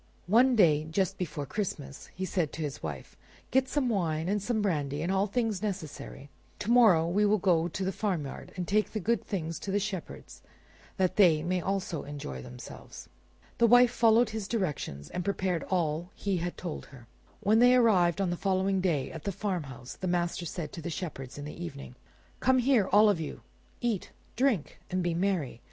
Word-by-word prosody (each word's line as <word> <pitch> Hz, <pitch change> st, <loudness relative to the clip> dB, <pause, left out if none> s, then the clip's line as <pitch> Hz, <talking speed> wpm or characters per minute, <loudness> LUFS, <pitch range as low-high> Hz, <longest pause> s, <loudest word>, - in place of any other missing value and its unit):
One 245 Hz, +7 st, +5 dB
day, 155 Hz, -7 st, +4 dB
just 190 Hz, +3 st, 0 dB
before 150 Hz, -5 st, -3 dB
Christmas, 145 Hz, -6 st, -5 dB
he 190 Hz, -, -3 dB
said 175 Hz, -5 st, -1 dB
to 160 Hz, -, -4 dB
his 145 Hz, -1 st, -5 dB
wife, -, -, -6 dB, 0.4 s
"Get 260 Hz, 0 st, +2 dB
some 285 Hz, -4 st, 0 dB
wine, 165 Hz, -7 st, 0 dB
and 205 Hz, +2 st, 0 dB
some 225 Hz, +2 st, -1 dB
brandy, 150 Hz, -7 st, -1 dB
and 175 Hz, -, -1 dB
all 195 Hz, +1 st, +2 dB
things 215 Hz, -2 st, -1 dB
necessary; 155 Hz, -8 st, -6 dB, 0.3 s
to 210 Hz, -, -2 dB
morrow 210 Hz, -10 st, +6 dB
we 195 Hz, +5 st, +2 dB
will 210 Hz, +1 st, +4 dB
go 175 Hz, -4 st, +2 dB
to 185 Hz, +3 st, -3 dB
the 190 Hz, -, 0 dB
farmyard 175 Hz, -9 st, -3 dB
and 180 Hz, -2 st, -4 dB
take 215 Hz, +1 st, +1 dB
the 215 Hz, -, -1 dB
good 230 Hz, +5 st, 0 dB
things 165 Hz, -5 st, -4 dB
to -, -, -6 dB
the 195 Hz, -, +1 dB
shepherds 195 Hz, -4 st, -6 dB, 0.6 s
that 185 Hz, -2 st, +1 dB
they 165 Hz, -7 st, +5 dB
may 180 Hz, +1 st, 0 dB
also 185 Hz, -4 st, -2 dB
enjoy 140 Hz, -, -6 dB
themselves." -, -, -10 dB, 0.5 s
The 235 Hz, -, +6 dB
wife 245 Hz, +1 st, +7 dB
followed 230 Hz, -1 st, +4 dB
his 215 Hz, -3 st, -4 dB
directions 150 Hz, -, -3 dB
and 180 Hz, -, -3 dB
prepared 185 Hz, -3 st, -1 dB
all 165 Hz, -3 st, 0 dB
that -, -, -21 dB
he 200 Hz, -2 st, +1 dB
had 175 Hz, +1 st, -3 dB
told 175 Hz, -4 st, -6 dB
her. 125 Hz, -4 st, -14 dB, 0.4 s
When 215 Hz, +2 st, +4 dB
they 245 Hz, +1 st, +7 dB
arrived 195 Hz, -8 st, +4 dB
on 190 Hz, -3 st, +1 dB
the -, -, 0 dB
following 190 Hz, 0 st, +1 dB
day 160 Hz, -8 st, 0 dB
at 160 Hz, -, -8 dB
the 200 Hz, -, 0 dB
farmhouse, 160 Hz, -, -5 dB
the 185 Hz, -, -4 dB
master 175 Hz, -1 st, -1 dB
said 155 Hz, -1 st, -5 dB
to 165 Hz, -, -7 dB
the 170 Hz, -, -4 dB
shepherds 145 Hz, -7 st, -6 dB
in 145 Hz, -, -6 dB
the 150 Hz, -, -7 dB
evening— 70 Hz, -6 st, -8 dB, 0.5 s
"Come 260 Hz, 0 st, +3 dB
here, 250 Hz, -5 st, +3 dB
all 210 Hz, +2 st, +7 dB
of 200 Hz, -5 st, +3 dB
you; 155 Hz, -, -6 dB, 0.4 s
eat, 230 Hz, -6 st, -1 dB, 0.3 s
drink, 245 Hz, -, 0 dB
and 185 Hz, 0 st, -1 dB
be 175 Hz, -1 st, 0 dB
merry. 170 Hz, -9 st, -1 dB
185 Hz, 195 wpm, -29 LUFS, 160-210 Hz, 0.6 s, wife